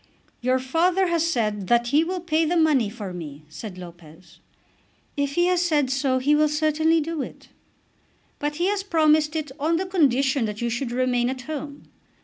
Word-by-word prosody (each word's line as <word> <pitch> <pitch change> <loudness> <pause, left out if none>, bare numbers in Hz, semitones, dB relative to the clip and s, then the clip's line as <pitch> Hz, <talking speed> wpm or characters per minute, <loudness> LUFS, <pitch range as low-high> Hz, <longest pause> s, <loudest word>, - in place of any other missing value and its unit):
"Your 255 +1 +2
father 340 +8 +1
has 335 -1 +1
said 210 - -1
that 240 +2 +2
he 295 +4 +4
will 360 +2 -3
pay 325 -1 +1
the 340 +2 +1
money 295 -9 +3
for 205 -4 -7
me," 155 -4 -8
said 180 +5 -8
Lopez. 170 -1 -13 0.8
"If 285 0 -2
he 345 - +3
has 360 -1 +2
said 300 -7 +1
so 265 -1 +1
he 295 +4 +3
certainly 310 +2 +1
will 320 - +2
do 325 -1 -3
it." - - -9 0.9
"But 295 0 -2
he 345 +3 0
has 405 +1 0
promised 310 -4 +2
it 305 -3 -3
on 315 +4 +1
the 375 - -2
condition 275 -8 +2
that 210 -1 -5
you 235 0 -1
should 240 +1 -3
remain 245 -1 +1
at 260 -1 -4
home. 290 +1 -7
285 Hz, 185 wpm, -24 LUFS, 240-320 Hz, 0.9 s, he